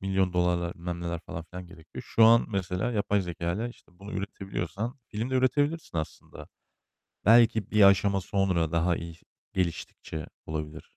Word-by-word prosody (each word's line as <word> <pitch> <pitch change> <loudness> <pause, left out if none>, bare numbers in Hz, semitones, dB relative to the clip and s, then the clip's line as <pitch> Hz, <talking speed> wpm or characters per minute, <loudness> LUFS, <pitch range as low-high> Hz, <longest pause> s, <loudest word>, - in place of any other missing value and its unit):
milyon 95 -1 +1
dolarlar, 90 -1 +1
bilmem 85 0 -5
neler 85 -1 -3
falan 80 -1 -7
filan 90 +2 -9
gerekiyor. 85 -3 -11
Şu 115 - +5
an 115 +1 +6
mesela 95 +2 -2
yapay 105 -1 +1
zekâyla, 90 +5 -3
işte, 120 - -16
bunu 100 +1 -9
üretebiliyorsan 100 - -4
film 115 +4 -4
de - - -1
üretebilirsin 145 - +1
aslında. 80 - -7 0.8
Belki 115 0 +5
bir 105 -1 +4
aşama 100 0 +5
sonra 90 -4 0
daha 85 +1 +2
iyi 85 -1 -7 0.4
geliştikçe 85 -3 -3 0.2
olabilir. 80 0 -5
95 Hz, 150 wpm, -28 LUFS, 85-105 Hz, 0.8 s, an